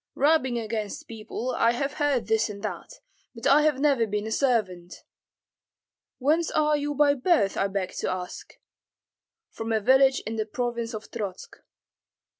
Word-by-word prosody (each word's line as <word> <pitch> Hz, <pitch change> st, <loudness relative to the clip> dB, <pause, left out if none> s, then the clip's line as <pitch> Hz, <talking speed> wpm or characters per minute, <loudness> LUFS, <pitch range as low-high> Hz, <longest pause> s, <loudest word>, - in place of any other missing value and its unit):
"Rubbing 275 Hz, -4 st, +2 dB
against 220 Hz, -2 st, -4 dB
people, 230 Hz, +3 st, -5 dB
I 230 Hz, -, +3 dB
have 275 Hz, +3 st, -2 dB
heard 285 Hz, -5 st, 0 dB
this 220 Hz, 0 st, +1 dB
and 200 Hz, 0 st, -8 dB
that, 215 Hz, -, -5 dB, 0.4 s
but 230 Hz, -, -9 dB
I 280 Hz, +2 st, +6 dB
have 300 Hz, -3 st, +2 dB
never 275 Hz, -6 st, +2 dB
been 210 Hz, 0 st, -2 dB
a 220 Hz, -, -5 dB
servant." 205 Hz, -9 st, -1 dB, 1.1 s
"Whence 310 Hz, +5 st, +1 dB
are 300 Hz, 0 st, +2 dB
you 290 Hz, 0 st, -2 dB
by 290 Hz, 0 st, +4 dB
birth, 260 Hz, -, +2 dB
I 195 Hz, -, +1 dB
beg 195 Hz, -2 st, -3 dB
to -, -, -2 dB
ask?" 180 Hz, -1 st, -6 dB, 1.0 s
"From 225 Hz, 0 st, -5 dB
a 220 Hz, -, +2 dB
village 265 Hz, +4 st, +4 dB
in 225 Hz, +1 st, -5 dB
the 215 Hz, -, -1 dB
province 235 Hz, 0 st, -3 dB
of 215 Hz, -, -9 dB
Trotsk." 200 Hz, -5 st, -6 dB
235 Hz, 160 wpm, -26 LUFS, 215-280 Hz, 1.1 s, I